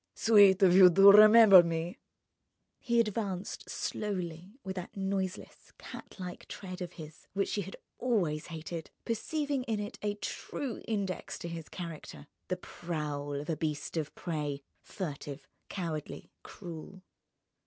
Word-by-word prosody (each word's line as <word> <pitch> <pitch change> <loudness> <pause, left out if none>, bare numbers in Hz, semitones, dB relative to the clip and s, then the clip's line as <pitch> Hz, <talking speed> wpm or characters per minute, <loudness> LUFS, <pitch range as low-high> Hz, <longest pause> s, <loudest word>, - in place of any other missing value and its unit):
"Sweet 205 -3 +6
of 180 -1 +6
you 185 -1 +9
to 195 +3 +8
remember 215 -2 +9
me!" 170 +1 -3 0.8
He 235 -1 +1
advanced 205 -4 -2
slowly 185 -1 -4
with 190 -1 -5
that 180 +2 -7
noiseless, 190 -1 -4
cat - - -10
like 180 -2 -8
tread 185 -1 -8
of 180 -1 -5
his 155 -2 -12
which 195 0 0
she 205 - -1
had 195 +1 -8 0.2
always 185 -12 0
hated, 165 0 -6 0.2
perceiving 285 +4 -2
in 220 -4 -1
it 210 +3 -6
a 205 -1 -1
true 250 +4 -5
index 200 -5 -3
to - - -7
his 165 -2 -7
character: 165 -4 -8 0.2
the 180 - -2
prowl 150 -5 -5
of 145 +2 -5
a - - 0
beast 150 0 -3
of 155 -3 -3
prey, 150 -4 -4 0.2
furtive, 145 -6 -7 0.2
cowardly, 165 -6 -5
cruel. 180 +1 -10
185 Hz, 140 wpm, -31 LUFS, 160-205 Hz, 0.8 s, you